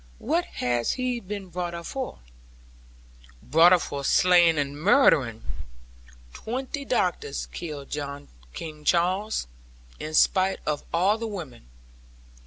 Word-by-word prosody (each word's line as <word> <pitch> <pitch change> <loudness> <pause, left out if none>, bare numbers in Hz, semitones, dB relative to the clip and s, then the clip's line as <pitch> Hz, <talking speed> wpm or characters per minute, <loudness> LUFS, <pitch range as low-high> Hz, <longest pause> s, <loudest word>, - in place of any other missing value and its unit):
What 335 +7 0 0.2
has 120 -1 +1
he 255 -1 -2
been 200 -2 -7
brought 175 0 -4
up 170 0 -7
for?' 265 - -5 1.2
'Brought 165 +5 +6
up 180 -2 +5
for 140 0 -5
slaying 175 +1 +5
and 145 0 -2
murdering. 155 - +4 0.9
Twenty 265 +4 -4
doctors 180 - -1
killed 150 -5 -6 0.6
King 155 - -8
Charles, 185 - +1 0.5
in 155 +1 -5
spite 190 +2 +3
of 150 -1 -2
all 190 +6 +2
the 230 - -3
women. 160 - -8
175 Hz, 115 wpm, -26 LUFS, 150-210 Hz, 1.2 s, Brought